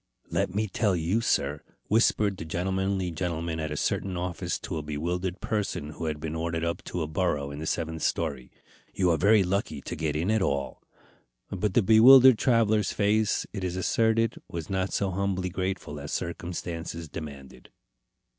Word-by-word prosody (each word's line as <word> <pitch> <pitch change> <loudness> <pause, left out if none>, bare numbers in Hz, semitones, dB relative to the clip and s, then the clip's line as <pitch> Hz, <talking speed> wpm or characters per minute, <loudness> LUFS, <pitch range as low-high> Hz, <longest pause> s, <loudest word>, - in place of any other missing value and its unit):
"Let 90 - -1
me 110 +1 +1
tell 100 0 +1
you, 90 +7 0
sir," 75 -8 0 0.3
whispered 105 -2 +3
the - - -6
gentlemanly 95 +2 -1
gentleman 85 -1 -3
at 80 0 -2
a 75 - -4
certain 95 +3 -1
office 90 -2 -2
to - - -4
a - - -2
bewildered 85 +5 -3
person 100 -8 -2
who 80 - -6
had 75 -2 -2
been 80 0 -4
ordered 80 0 -2
up 85 - -3
to 90 - -3
a - - -3
burrow 75 -3 -1
in 70 - -7
the 80 - -4
seventh 80 -1 -2
story, 65 - -2 0.4
"you 90 -2 +3
are 80 - +2
very 100 +5 +5
lucky 90 -5 -1
to - - -5
get 75 -2 -2
in 85 +7 0
at 110 -1 +2
all." 70 -6 -1 0.7
But 100 +1 -1
the 120 - +5
bewildered 120 +3 +8
traveller's 110 -5 +3
face, 105 +1 +1
it 95 -3 -4
is 90 -1 -2
asserted, 115 +4 +1
was 85 +1 -6
not 95 0 -1
so 100 -2 0
humbly 95 -1 -1
grateful 95 -5 -3
as 70 - -7
circumstances 85 -1 -4
demanded. 70 -4 -9
90 Hz, 175 wpm, -27 LUFS, 80-100 Hz, 0.7 s, bewildered